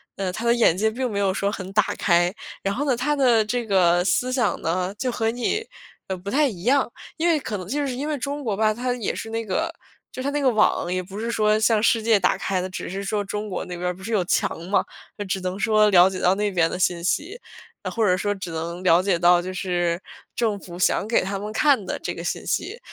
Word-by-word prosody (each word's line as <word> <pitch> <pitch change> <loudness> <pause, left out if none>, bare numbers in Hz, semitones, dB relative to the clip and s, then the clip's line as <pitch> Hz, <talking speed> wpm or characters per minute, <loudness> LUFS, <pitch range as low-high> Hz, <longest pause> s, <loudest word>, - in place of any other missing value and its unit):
呃， 190 -2 -2
他 225 +5 -5
的 235 - +4
眼 235 -8 +4
界 220 +3 +2
并 250 +3 -2
没 200 - -2
有 195 -2 +1
说 200 +1 -1
很 190 -2 -6
打 - - +4
开， 175 0 +3 0.3
然 195 0 0
后 290 +4 -2
呢， 260 -3 +2
他 295 +5 0
的 240 -5 +4
这 240 +2 -2
个 180 -4 +3
思 250 +5 +1
想 245 -4 0
呢， 180 +3 -1
就 255 +1 -1
和 225 -1 0
你， 245 - -1 0.4
呃， 190 - -2
不 190 +3 -6
太 290 +2 +3
一 180 -8 -7
样。 265 +3 +3 0.3
因 330 - +1
为 330 -2 +4
可 215 -6 -4
能 185 - -8
就 285 +6 -1
是 255 - -3
因 285 +4 -3
为 300 - -1
中 285 +2 -4
国 210 - 0
吧， 215 +1 +2
它 245 +2 -2
也 230 - -2
是 225 - -6
那 225 0 -2
个 325 - -1 0.4
就 255 - -5
是 - - -6
它 280 - 0
那 295 - -1
个 265 - +4
网， 215 -5 +2
也 185 - -1
不 195 +3 -8
是 230 - -3
说 215 -1 +2
向 220 -1 +3
世 230 -1 +3
界 220 -1 +4
打 180 - +2
开 185 -2 -1
的， 185 - -4
只 185 - -6
是 195 +2 -4
说 205 +1 -1
中 210 +1 -4
国 - - -4
那 180 - -6
边 180 +1 -3
儿 180 - -2
不 185 - -15
是 225 - -5
有 195 -4 +2
墙 165 - 0
嘛， 200 - +2 0.3
就 205 - -4
只 190 0 -2
能 185 +2 -3
说 215 -1 +4
了 185 -1 +6
解 185 - -5
到 180 - +4
那 210 0 0
边 165 -3 +2
的 - - -4
信 175 -1 +1
息。 345 - -1 0.4
呃， - - -3
或 230 - 0
者 185 -3 +3
说 205 +2 0
只 190 -3 -7
能 170 +2 -4
了 170 -1 +5
解 185 -3 +1
到 175 0 +5
就 185 +1 -6
是 175 -2 -1 0.3
政 215 -4 0
府 175 -1 -10
想 200 - +2
给 230 - +3
他 195 +1 -3
们 210 +2 -6
看 265 -5 +3
的 - - -4
这 - - -4
个 - - -7
信 - - -3
息， 450 +4 -2
205 Hz, 290 characters per minute, -23 LUFS, 185-235 Hz, 0.4 s, 了